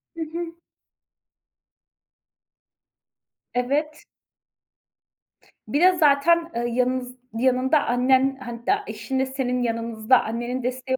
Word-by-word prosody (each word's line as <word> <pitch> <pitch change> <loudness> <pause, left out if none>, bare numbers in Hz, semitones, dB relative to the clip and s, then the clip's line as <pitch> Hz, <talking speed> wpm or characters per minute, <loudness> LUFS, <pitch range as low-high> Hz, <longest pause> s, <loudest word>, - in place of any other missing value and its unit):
Hı 330 - -6
hı. 335 +1 -6 3.0
Evet. 295 +5 -1 1.6
Bir 290 - 0
de 370 - +7
zaten, 330 +2 +3
ııı, 240 0 -1
yanınız 250 +1 -1 0.2
yanında 260 +4 +2
annen, 260 +2 +2
hatta 245 - -2
eşinle 265 -1 -2
senin 260 -2 -2
yanınızda 230 +1 +1
annenin 240 +3 -3
desteği 255 +1 -2
260 Hz, 90 wpm, -24 LUFS, 245-295 Hz, 3.0 s, de